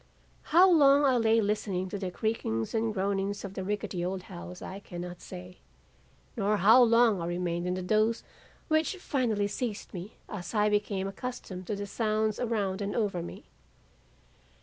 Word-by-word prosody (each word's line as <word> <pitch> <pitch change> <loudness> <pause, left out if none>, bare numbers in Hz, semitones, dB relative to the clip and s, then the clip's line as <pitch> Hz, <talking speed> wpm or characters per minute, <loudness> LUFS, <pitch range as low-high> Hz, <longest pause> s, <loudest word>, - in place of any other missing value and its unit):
"How 355 +4 +6
long 290 -5 +6
I 265 -2 +4
lay 225 -1 +4
listening 200 -3 -1
to 200 - -4
the 190 -2 -3
creakings 180 - -2
and 225 0 +1
groanings 200 0 -1
of 195 - -7
the 190 - -4
rickety 195 -3 -3
old 185 +1 -3
house, 85 - -9
I 195 - -7
cannot 175 -2 -8
say, 180 0 -10 0.8
nor 210 -2 +1
how 220 +6 +7
long 230 -4 +5
I 170 - -3
remained 175 0 -2
in 180 - 0
the 185 - -4
doze 215 +4 +2 0.4
which 315 +4 +1
finally 235 - 0
seized 215 0 -4
me 185 +3 -7
as 195 0 -6
I 210 0 +3
became 205 -2 0
accustomed 195 -4 -6
to 210 - -1
the 205 0 -4
sounds 215 +1 0
around 210 -5 -1
and 200 0 -2
over 200 -6 0
me. 170 - -8
205 Hz, 170 wpm, -29 LUFS, 185-225 Hz, 0.8 s, how